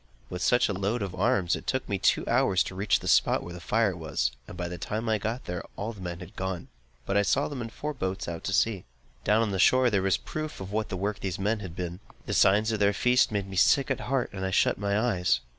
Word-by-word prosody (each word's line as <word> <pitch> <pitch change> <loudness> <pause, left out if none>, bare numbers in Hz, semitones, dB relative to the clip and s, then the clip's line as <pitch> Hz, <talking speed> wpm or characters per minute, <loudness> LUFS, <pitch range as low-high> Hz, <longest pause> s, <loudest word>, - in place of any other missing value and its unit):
With 90 - -4
such 125 - +3
a 100 - -1
load 100 +4 -1
of 95 -2 -4
arms, 95 -2 +2
it - - -9
took - - -1
me - - -1
two - - +2
hours 95 -2 +3
to - - -7
reach 100 +2 +1
the - - -6
spot - - +3
where 85 - -8
the 90 - -8
fire 105 +2 +1
was; 75 -8 -1 0.2
and 90 - -9
by 90 0 -3
the 90 0 -6
time 110 +6 -3
I 110 -1 +2
got 115 +5 -3
there, 90 -1 -4
the 110 +3 -3
men 85 -1 -5
had 90 - -8
all - - -26
gone; 95 -2 -4 0.4
but 95 - -1
I 100 - +5
saw 135 +7 +1
them 140 -4 -5
in 115 - -5
four 150 +6 -5
boats 95 -7 -3
out 85 +2 -4
at 95 - +1
sea. 105 -4 +1 0.4
Down 110 +3 +3
on 110 - -1
the 95 - -2
shore, 130 +4 +5
there 100 -2 +2
was 95 0 +2
a - - -5
proof 155 0 -5
of 95 0 -7
what 110 0 -1
the 95 - -3
work 100 +2 -2
of - - -19
these 95 -3 -3
men 105 +3 0
had 90 -5 -8
been. 90 0 -4 0.3
The - - -3
signs 105 +3 +4
of 110 - -1
their 100 0 +3
feast 125 +5 +3
made 100 -2 -2
me 95 -1 -6
sick 135 +8 +4
at - - 0
heart, 130 -1 -1
and 95 -1 -5
I 95 - 0
shut 95 - +2
my 100 0 0
eyes. 105 - +2
100 Hz, 280 wpm, -28 LUFS, 90-110 Hz, 0.4 s, I